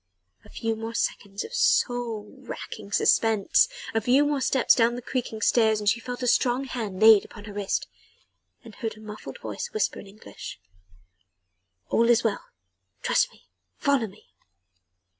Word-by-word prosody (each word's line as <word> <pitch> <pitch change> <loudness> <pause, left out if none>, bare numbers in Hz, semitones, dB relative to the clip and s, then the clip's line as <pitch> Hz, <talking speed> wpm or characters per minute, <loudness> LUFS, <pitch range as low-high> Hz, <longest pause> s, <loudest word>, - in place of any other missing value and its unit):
A - - -17
few 225 0 -2
more 225 +1 -6
seconds 200 -3 -2
of 460 - -10
soul 245 - +1
racking 220 -5 -8
suspense, 220 - +3 0.3
a 225 - +1
few 255 +6 +4
more 290 -2 0
steps 260 0 +4
down 235 -1 +3
the 245 - -6
creaking 235 -4 -3
stairs 220 -3 +3
and 210 - -5
she 225 - +3
felt 245 +1 -6
a - - 0
strong 245 +2 +2
hand 220 -8 -5
laid 215 -1 +8
upon - - -12
her 210 - -9
wrist 200 -1 -1 0.8
and 230 -3 -12
heard 220 +1 -5
a - - -13
muffled 215 -1 -9
voice - - -5
whisper 435 - -1
in - - -11
English: 205 +2 -10 1.3
"All 230 +1 +3
is 240 -1 +4
well! 220 -3 -1 0.6
Trust - - +2
me! - - -23 0.3
Follow 275 - +1
me!" 195 - -17
225 Hz, 160 wpm, -26 LUFS, 215-245 Hz, 1.3 s, laid